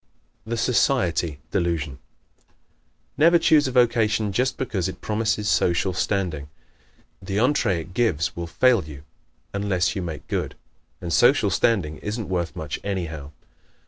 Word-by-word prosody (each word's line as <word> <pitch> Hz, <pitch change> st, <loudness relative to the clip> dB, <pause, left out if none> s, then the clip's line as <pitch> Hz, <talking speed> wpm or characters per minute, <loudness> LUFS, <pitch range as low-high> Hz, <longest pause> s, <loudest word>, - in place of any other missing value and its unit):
The 115 Hz, +1 st, -2 dB
"Society" 90 Hz, -, +1 dB
Delusion 85 Hz, -7 st, -1 dB, 0.5 s
¶ -, -, -44 dB, 0.7 s
Never 170 Hz, +3 st, +6 dB
choose 155 Hz, -3 st, +4 dB
a -, -, -2 dB
vocation 115 Hz, -4 st, +2 dB
just 125 Hz, +5 st, 0 dB
because 95 Hz, -8 st, -2 dB
it -, -, -9 dB
promises 110 Hz, -1 st, -1 dB
social 90 Hz, -1 st, +2 dB
standing. 90 Hz, -7 st, -2 dB, 0.7 s
The 95 Hz, +1 st, -4 dB
entree 115 Hz, -, +2 dB
it 90 Hz, +3 st, -12 dB
gives 90 Hz, -9 st, 0 dB
will 85 Hz, 0 st, -5 dB
fail 120 Hz, +5 st, +3 dB
you 70 Hz, -2 st, -10 dB, 0.5 s
unless 100 Hz, 0 st, 0 dB
you 95 Hz, -, -2 dB
make 80 Hz, -4 st, -6 dB
good. -, -, -3 dB, 0.5 s
And 85 Hz, -1 st, -3 dB
social -, -, +4 dB
standing 90 Hz, -10 st, +1 dB
isn't 105 Hz, 0 st, -4 dB
worth 85 Hz, -2 st, -2 dB
much 75 Hz, -2 st, -5 dB
anyhow. 80 Hz, -8 st, -4 dB
95 Hz, 140 wpm, -23 LUFS, 85-115 Hz, 0.7 s, Never